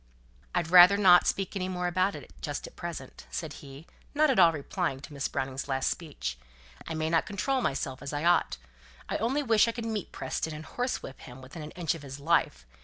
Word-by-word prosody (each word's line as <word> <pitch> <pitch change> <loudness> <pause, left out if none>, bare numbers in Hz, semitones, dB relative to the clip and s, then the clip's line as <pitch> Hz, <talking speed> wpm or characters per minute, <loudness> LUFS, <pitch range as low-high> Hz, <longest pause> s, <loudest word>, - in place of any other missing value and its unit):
"I'd 170 -2 0
rather 180 +2 +9
not 180 -3 +6
speak 195 +1 -1
any 185 -1 -2
more 180 -1 -2
about 185 +2 +1
it 135 - -11
just - - -4
at - - -12
present," - - -7
said - - -4
he, 140 +2 -11 0.3
not 305 -1 +4
at 250 - +2
all 170 -2 +8
replying 155 -1 -3
to 145 - -10
Miss 140 -1 -2
Browning's 135 -1 -3
last 135 -1 0
speech. 65 - -5 0.5
"I 165 - -3
may 155 0 -1
not 165 0 +1
control 260 +7 0
myself 135 - -2
as 140 - -5
I 145 +1 -3
ought. 175 0 +3 0.5
I - - 0
only 265 +7 0
wish 225 -3 +4
I - - +1
could 230 -1 -5
meet 220 -4 -3
Preston, 160 -1 -3
and 155 +1 -8
horsewhip 245 - -4
him 125 +1 -11
within 130 +5 -10
an 150 - -7
inch 170 -4 0
of 165 - -8
his 140 -1 -8
life. 140 - +1
165 Hz, 215 wpm, -29 LUFS, 140-195 Hz, 0.5 s, rather